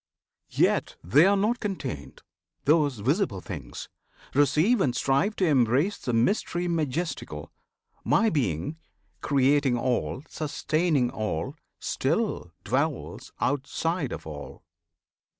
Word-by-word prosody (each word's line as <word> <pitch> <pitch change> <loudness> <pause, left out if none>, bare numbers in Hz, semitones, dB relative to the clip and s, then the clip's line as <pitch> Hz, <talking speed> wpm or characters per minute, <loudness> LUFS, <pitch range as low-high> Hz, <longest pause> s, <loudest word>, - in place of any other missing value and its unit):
Yet - - +1
they 145 - +5
are 200 0 +4
not 220 +5 +1
contained, 185 - -5 0.4
Those 145 -4 +3
visible 130 - 0
things! 75 -10 -7 0.5
Receive 155 - +3
and 125 -8 +1
strive 140 +13 +1
to 190 - +1
embrace 140 - +2
The 125 - -2
mystery 175 - +1
majestical! 165 0 -2 0.5
My 225 -1 +3
Being 120 - -1 0.4
Creating 140 -2 +3
all, 130 +2 -1
sustaining 155 -3 0
all 105 -7 -3 0.2
still - - -1
dwells - - -2
Outside 145 +2 -1
of - - -6
all! 75 -2 -8
145 Hz, 105 wpm, -27 LUFS, 120-170 Hz, 0.5 s, they